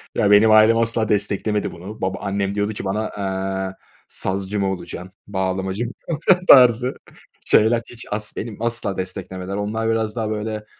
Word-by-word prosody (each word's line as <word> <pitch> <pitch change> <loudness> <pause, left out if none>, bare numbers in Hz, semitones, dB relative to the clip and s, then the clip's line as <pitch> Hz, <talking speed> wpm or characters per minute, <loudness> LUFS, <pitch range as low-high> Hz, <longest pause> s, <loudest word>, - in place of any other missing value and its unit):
Ya 105 -1 +2
benim 110 +2 +6
ailem 110 +1 +6
asla 115 -1 0
desteklemedi 105 0 0
bunu. 95 +5 -10
Baba 95 0 -2
annem 100 0 -2
diyordu 105 +1 -1
ki 100 - -6
bana, 105 +3 -2
eee, 95 -1 -3 0.3
sazcı 95 +2 -2
mı 95 -1 0
olacaksın, 90 0 -7 0.2
bağlamacı 95 +2 -2
mı 120 - -5 0.2
olacaksın 175 +3 +2
tarzı 125 -1 +7 0.5
şeyler 115 +2 +4
hiç 120 -1 -8
as 105 0 -3
benim 110 -1 -6
asla 115 -4 -1
desteklemediler. 95 0 -5
Onlar 110 +2 -2
biraz 110 -1 -1
daha 110 -2 -2
böyle 110 0 -4
105 Hz, 160 wpm, -21 LUFS, 95-110 Hz, 0.5 s, tarzı